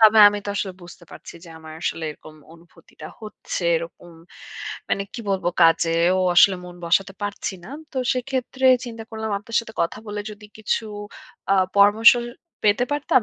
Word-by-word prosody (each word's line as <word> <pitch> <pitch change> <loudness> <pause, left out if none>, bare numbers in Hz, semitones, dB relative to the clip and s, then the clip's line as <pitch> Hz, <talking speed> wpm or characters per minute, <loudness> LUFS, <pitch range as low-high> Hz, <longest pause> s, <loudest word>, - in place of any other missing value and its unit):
তবে 220 0 +7
আমি 205 0 -3
তো - - -6
আসলে 195 -2 -2
বুঝতে 175 - -13
পারছি - - -11
যে - - -13
আমার 160 0 -11
আসলে 165 - -2
এরকম 155 +1 -13 0.2
অনুভূতিটা 165 -2 -15 0.2
হচ্ছে, 210 -3 -6
এরকম 170 +1 -8 0.8
মানে 200 - +1
কি 240 - -5
বলবো 190 -2 0
কাজেও 165 +1 +4 0.2
আসলে 190 +2 +6
মন 180 0 -10
বসাতে 195 +4 +1
পারছি 205 -1 -3
না। - - -11 0.2
তো - - -11 0.2
সেক্ষেত্রে 260 +1 -3 0.2
চিন্তা 230 -1 -7
করলাম 220 -1 -4
আপনার 230 +3 -5
সাথে 225 -1 -12
কথা 170 - -3
বলে 205 0 -4
যদি 210 0 -12
কিছু 220 +1 -1 0.7
আ - - +5 0.2
পরামর্শ 205 +3 +7 0.5
পেতে 210 +4 +3
পারতাম, 290 -3 +2
205 Hz, 165 wpm, -22 LUFS, 170-220 Hz, 0.8 s, তবে